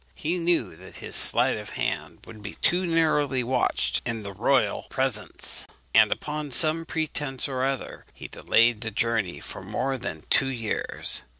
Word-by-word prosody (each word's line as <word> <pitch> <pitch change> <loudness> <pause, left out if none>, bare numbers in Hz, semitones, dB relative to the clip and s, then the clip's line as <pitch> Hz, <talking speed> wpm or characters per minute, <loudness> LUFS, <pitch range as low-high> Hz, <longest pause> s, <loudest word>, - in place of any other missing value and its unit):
He 170 +4 -2
knew 165 - 0
that 95 +2 -13
his - - 0
sleight - - +5
of - - -9
hand - - -4
would 110 -2 -13
be 105 0 -8
too 180 +1 +1
narrowly 150 -5 +1
watched 125 0 0
in 115 -2 -3
the 100 -1 -6
royal 120 +8 0
presence; 130 -5 -1 0.3
and - - +5
upon 150 0 -4
some 160 +4 +4
pretence 145 -5 -3
or 130 -2 -3
other 135 -1 -4
he - - -10
delayed 115 -1 +1
the 110 - -2
journey 110 -3 -2
for - - -8
more 135 0 -3
than 80 -8 -6
two 135 - +5
years. 115 -5 +2
130 Hz, 165 wpm, -25 LUFS, 115-150 Hz, 0.3 s, sleight